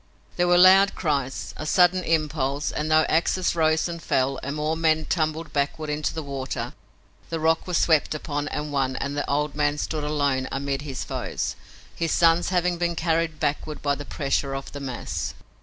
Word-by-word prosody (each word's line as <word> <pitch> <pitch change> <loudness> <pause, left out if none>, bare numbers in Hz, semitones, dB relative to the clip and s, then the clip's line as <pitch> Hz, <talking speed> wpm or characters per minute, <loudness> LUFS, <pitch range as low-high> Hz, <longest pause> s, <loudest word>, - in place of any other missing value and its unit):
There 175 0 +2
were 175 0 +5
loud 190 +2 +7
cries, 140 -5 -2
a 155 - -5
sudden 180 +2 +4
impulse 150 -4 0
and, 150 +1 -2
though 155 0 +5
axes 175 +2 +1
rose 160 0 +2
and 170 -1 -6
fell 135 -2 0
and 140 +2 -4
more 155 +1 -1
men 160 -1 +2
tumbled 160 0 -1
backward 150 +2 -1
into 150 +1 -1
the 160 - -5
water, 135 -2 -4 0.6
the 165 - -2
rock 160 +2 +1
was 180 -2 +1
swept 155 -2 +3
upon 145 -1 -3
and 150 0 -4
won 135 -2 0
and 140 +2 -3
the 145 - -2
old 150 +1 0
man 145 0 +1
stood 155 0 -3
alone 140 -3 0
amid 140 0 -2
his 140 -3 -5
foes, - - -3 0.4
his 165 -1 -1
sons 165 0 +4
having 180 -1 +1
been 170 -1 0
carried 165 -1 0
backward 150 +1 -2
by 145 -1 +2
the 145 - -5
pressure 140 -1 -1
of 135 0 -6
the 145 - -7
mass. 130 -3 -4
155 Hz, 190 wpm, -25 LUFS, 140-165 Hz, 0.6 s, loud